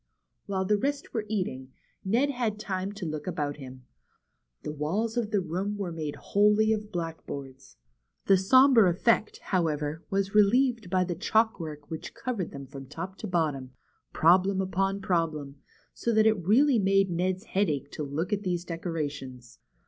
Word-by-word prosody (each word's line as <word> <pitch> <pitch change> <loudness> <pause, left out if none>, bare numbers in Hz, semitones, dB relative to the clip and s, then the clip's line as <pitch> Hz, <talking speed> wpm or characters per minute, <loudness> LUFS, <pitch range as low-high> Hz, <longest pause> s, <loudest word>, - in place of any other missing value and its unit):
While 190 -1 -1
the 210 +1 +2
rest 280 +4 -2
were 220 -2 -2
eating, 130 -11 -3 0.3
Ned 240 +9 +2
had 235 -5 -2
time 195 -2 -3
to 200 -3 -6
look 155 0 -5
about 145 -5 -2
him. 130 -2 -11 0.8
The - - -4
walls 185 +10 -2
of 235 -3 -1
the 205 -2 +1
room 185 +5 -3
were 195 -4 -3
made 155 -3 -4
wholly 210 +2 +3
of 210 -1 -4
blackboards. 140 -6 -6 0.5
The 195 - +6
sombre 235 +2 +6
effect, 210 +5 +1
however, 155 -3 -1
was 195 -1 -1
re 210 - +7
lieved 235 -1 +2
by 185 0 +2
the 180 -1 -2
chalk 220 +5 +1
work 150 -2 -8
which 160 - -6
covered 230 -8 -3
them 140 0 -8
from 135 0 -10
top 185 +7 -6
to 215 - -5
bottom, 150 -8 -1 0.4
problem 185 +4 +4
upon 195 +1 0
problem, 160 -7 -1 0.4
so 235 - -1
that 220 0 +5
it 215 -5 +3
really 255 +4 +5
made 195 -1 +3
Ned's 185 +2 -1
head 200 -3 0
ache 140 -1 -3
to - - -6
look 155 +7 -2
at 205 - 0
these 180 -3 -2
decorations. 145 -8 -5
185 Hz, 170 wpm, -28 LUFS, 155-210 Hz, 0.8 s, re